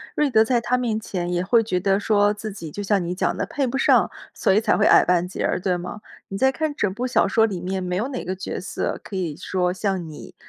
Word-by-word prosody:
瑞 300 Hz, -1 st, +2 dB
德 220 Hz, -4 st, +5 dB
在 240 Hz, +2 st, +1 dB
她 240 Hz, +2 st, 0 dB
面 230 Hz, -3 st, -1 dB
前 180 Hz, -5 st, -4 dB
也 175 Hz, 0 st, 0 dB
会 225 Hz, +5 st, +3 dB
觉 185 Hz, -4 st, -1 dB
得 195 Hz, +1 st, +2 dB
说 205 Hz, 0 st, +2 dB
自 215 Hz, +1 st, -6 dB
己 180 Hz, -5 st, -8 dB
就 205 Hz, +7 st, -6 dB
像 200 Hz, -1 st, +1 dB
你 175 Hz, +1 st, -3 dB
讲 -, -, 0 dB
的， -, -, -1 dB
配 280 Hz, -, -2 dB
不 260 Hz, +2 st, -2 dB
上， -, -, +3 dB, 0.2 s
所 195 Hz, -, +2 dB
以 205 Hz, -, +4 dB
才 220 Hz, -, +2 dB
会 210 Hz, -, +2 dB
矮 -, -, +6 dB
半 180 Hz, -1 st, +2 dB
截 180 Hz, -, -3 dB
儿， -, -, 0 dB
对 180 Hz, -1 st, 0 dB
吗？ 180 Hz, +4 st, -7 dB, 0.3 s
你 195 Hz, -, -5 dB
在 265 Hz, +5 st, +3 dB
看 310 Hz, +1 st, -2 dB
整 205 Hz, -8 st, 0 dB
部 245 Hz, +5 st, -3 dB
小 245 Hz, -, +3 dB
说 225 Hz, +2 st, +4 dB
里 195 Hz, -6 st, -4 dB
面 190 Hz, +1 st, -3 dB
没 180 Hz, -1 st, -2 dB
有 220 Hz, +8 st, -1 dB
哪 260 Hz, -, -5 dB
个 185 Hz, +2 st, -3 dB
角 190 Hz, -, -5 dB
色 190 Hz, -, -3 dB
可 200 Hz, -, -9 dB
以 175 Hz, -5 st, -2 dB
说 180 Hz, 0 st, -1 dB
像 190 Hz, -1 st, -2 dB
你 150 Hz, -, -11 dB
200 Hz, 290 characters per minute, -23 LUFS, 180-225 Hz, 0.3 s, 矮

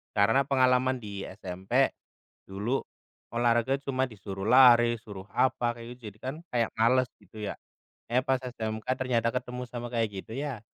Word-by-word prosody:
Karena 115 Hz, +7 st, +4 dB
pengalaman 130 Hz, -2 st, +3 dB
di 100 Hz, -2 st, -6 dB
SMP, 95 Hz, -1 st, 0 dB, 0.6 s
dulu 105 Hz, +7 st, -1 dB, 0.5 s
olahraga 120 Hz, +3 st, +2 dB
cuma 130 Hz, -2 st, 0 dB
disuruh 100 Hz, -4 st, -7 dB
lari, 120 Hz, -1 st, +7 dB
suruh 100 Hz, -3 st, -9 dB
apa, 120 Hz, -2 st, +2 dB
kayak 120 Hz, +1 st, -9 dB
gitu. -, -, -29 dB
Jadi 105 Hz, -, -23 dB
kan 130 Hz, +3 st, -4 dB, 0.2 s
kayak 115 Hz, -2 st, +2 dB
males, 125 Hz, +3 st, +4 dB
gitu 105 Hz, +1 st, -17 dB
ya. -, -, -3 dB, 0.6 s
Eh, 125 Hz, -, +4 dB
pas 130 Hz, -1 st, +2 dB
SMK, 110 Hz, -3 st, -4 dB
ternyata 120 Hz, -3 st, +1 dB
ketemu 125 Hz, 0 st, -3 dB
sama 120 Hz, 0 st, -5 dB
kayak 115 Hz, -2 st, +1 dB
gitu. -, -, -14 dB
Ya, 140 Hz, -6 st, -3 dB
120 Hz, 155 wpm, -29 LUFS, 110-130 Hz, 0.6 s, lari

